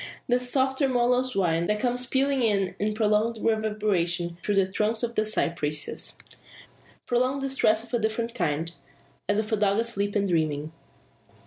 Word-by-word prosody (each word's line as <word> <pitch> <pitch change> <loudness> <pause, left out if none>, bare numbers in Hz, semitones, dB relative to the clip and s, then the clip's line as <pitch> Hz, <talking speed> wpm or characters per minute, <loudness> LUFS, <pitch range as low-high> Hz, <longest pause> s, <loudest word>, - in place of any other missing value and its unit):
The 245 -1 +3
soft 260 +1 0
tremulous 250 -2 +2
whine, 170 -3 +1
that 210 0 0
comes 250 +1 -1
pealing 270 +1 +1
in 205 -1 +1
prolonged 215 +1 +2
reverberation 200 -6 0
through 205 - 0
the 195 -1 +4
trunks 215 +4 -1
of 235 0 -1
the 215 - +1
cypresses, 155 -8 -1 0.9
proclaims 255 +3 0
distress 230 -5 +2
of 240 - -15
a 240 - +2
different 230 +2 -2
kind 165 -5 -1 0.6
as 205 - +3
of 215 +1 -2
a 220 - +2
dog 200 -1 +2
asleep 210 -3 -1
and 200 -1 +2
dreaming! 155 -3 0
215 Hz, 150 wpm, -26 LUFS, 190-245 Hz, 0.9 s, the